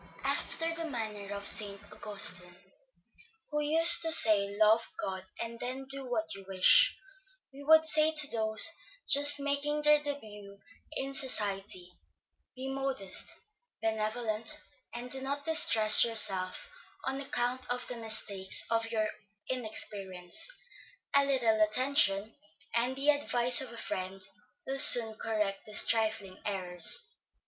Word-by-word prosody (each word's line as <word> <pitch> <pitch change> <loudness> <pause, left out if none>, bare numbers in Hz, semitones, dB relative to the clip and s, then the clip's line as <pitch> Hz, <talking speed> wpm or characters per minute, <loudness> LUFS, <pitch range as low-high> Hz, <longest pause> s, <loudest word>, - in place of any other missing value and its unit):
After 330 0 -4
the 330 -1 -8
manner 215 -5 -8
of 200 0 -10
St. 200 -2 +1
Augustine, 180 -4 -2 1.0
who 295 0 -5
used 330 +3 +4
to 325 -1 -2
say, 215 -10 +7
Love 220 +2 -1
God, 190 -1 -7 0.2
and 230 0 -10
then 255 +2 -8
do 275 0 -5
what 220 -3 -6
you 195 0 -12
wish, 195 - +2 0.6
we 280 +1 -15
would 315 +2 +2
say 310 0 +4
to 305 -1 +2
those, 220 +4 0 0.4
just 290 +1 +8
making 285 +1 -5
their 300 0 +2
début 210 -9 -11 0.4
in 275 -2 -8
society, 195 -8 -1 0.6
Be 260 +1 -10
modest, 270 -8 -5 0.5
benevolent, 220 0 -3 0.3
and 240 +1 -11
do 265 - -1
not 280 +1 -8
distress 220 -9 +7
yourself 195 -5 -2 0.4
on 270 +1 -7
account 250 -1 -5
of 245 0 -6
the 250 - -10
mistakes 210 -4 0
of 225 0 -4
your 220 -2 -4 0.4
inexperience; 200 - -2 0.6
a 280 0 +1
little 235 -6 -2
attention, 215 -2 -1 0.4
and 245 +3 -4
the 280 +2 -1
advice 245 -4 +2
of 260 -3 -7
a 235 - -13
friend, 190 -3 -9 0.5
will 270 +1 -6
soon 235 -5 +8
correct 215 -3 -7
these 210 - +2
trifling 220 -4 -5
errors. 185 - -1
230 Hz, 130 wpm, -26 LUFS, 210-275 Hz, 1.0 s, just